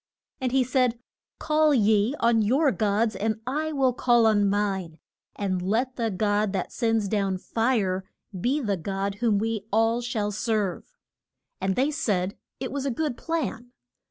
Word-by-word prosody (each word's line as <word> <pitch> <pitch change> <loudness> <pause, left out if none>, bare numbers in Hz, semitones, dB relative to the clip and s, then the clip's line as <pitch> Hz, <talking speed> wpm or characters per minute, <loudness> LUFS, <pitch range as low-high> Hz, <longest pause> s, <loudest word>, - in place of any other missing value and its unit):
And 255 -2 -1
he 265 0 +3
said, 250 -1 +1 0.4
Call 305 -1 +3
ye 215 +2 +3
on 230 -1 +3
your 270 +7 +3
gods 215 +2 +1
and 220 +1 -1
I 305 +5 -1
will 265 -4 +2
call 240 -1 +3
on 205 -2 +3
mine, 195 -5 -1 0.4
and 190 -3 -1
let 235 +8 0
the 230 -2 -1
God 205 +1 0
that 190 - -2
sends 225 -3 0
down 195 -2 0
fire 205 -3 0 0.3
be 245 +11 0
the 205 -6 -1
God 195 +3 -3
whom 225 -4 +3
we 220 -1 -2
all 225 +3 +2
shall 220 -4 -2
serve. 215 - -2 0.7
And 190 0 0
they 275 +4 +2
said 200 -10 -1 0.2
it 260 - -4
was 280 0 -2
a - - +1
good 290 +1 -2
plan. 250 -7 -3
225 Hz, 160 wpm, -26 LUFS, 200-255 Hz, 0.7 s, he